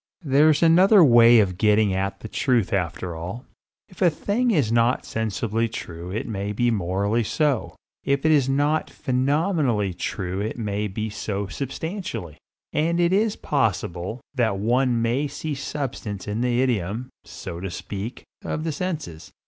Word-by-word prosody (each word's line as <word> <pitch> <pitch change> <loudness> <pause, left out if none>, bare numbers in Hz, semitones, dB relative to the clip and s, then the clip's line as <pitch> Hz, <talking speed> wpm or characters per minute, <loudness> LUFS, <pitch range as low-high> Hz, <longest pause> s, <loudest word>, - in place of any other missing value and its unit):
There's 150 +2 +4
another 185 +4 +7
way 120 -3 +7
of 95 -4 +1
getting 105 -2 +3
at 95 +1 -2
the - - -6
truth 120 -1 +1
after 90 -1 -2
all. 90 +10 -6 0.4
If 185 -2 -17
a 180 - +6
thing 205 +10 0
is 145 - +2
not 115 +2 +2
sensibly 110 +1 -1
true 85 -5 -7
it 105 +5 -3
may 100 -2 -3
be 120 +3 +1
morally 100 +3 0
so. 125 - 0 0.3
If 140 +1 0
it 155 - +5
is 140 -4 +3
not 145 +3 +1
phenomenally 130 - 0
true 95 0 -3
it 110 +3 -3
may 105 -2 -2
be 110 +2 -4
so 100 -1 -3
substantially. 135 - -5 0.3
And 170 +3 +1
it 175 +1 +3
is 215 +2 +2
possible 100 - -1
that 115 -7 +1
one 120 +3 +1
may 125 +6 +1
see 155 +2 -5
substance 130 -8 -5
in 105 +3 -2
the 125 0 +2
idiom, 115 +1 -2
so 85 -3 -8
to 95 +2 -4
speak, 100 +6 -6 0.2
of 155 - -3
the 160 - -1
senses. 150 - -5
115 Hz, 155 wpm, -24 LUFS, 100-145 Hz, 0.4 s, another